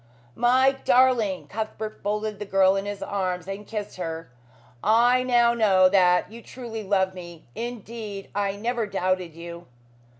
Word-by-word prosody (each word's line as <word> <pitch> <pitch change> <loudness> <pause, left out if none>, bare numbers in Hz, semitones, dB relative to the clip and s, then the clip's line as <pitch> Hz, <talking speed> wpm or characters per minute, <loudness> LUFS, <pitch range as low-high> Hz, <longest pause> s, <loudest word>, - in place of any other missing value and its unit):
"My 255 - +4
darling!" 245 -7 +3
Cuthbert 215 0 -5
folded 210 0 -2
the 210 - -5
girl 195 -1 +3
in 195 +1 -2
his 205 -1 -5
arms 185 -3 -3
and 195 +1 -6
kissed 210 -3 -5
her. 165 -5 -5 0.5
"I 240 +5 +4
now 240 -2 +3
know 195 -5 +4
that 180 0 +3
you 230 +1 -10
truly 230 -2 -7
love 190 -2 +1
me. 175 -3 -11
Indeed, 225 -3 -7
I 200 -1 -1
never 230 +1 -2
doubted 185 -3 -1
you." 170 +1 -9
205 Hz, 145 wpm, -25 LUFS, 185-230 Hz, 0.5 s, My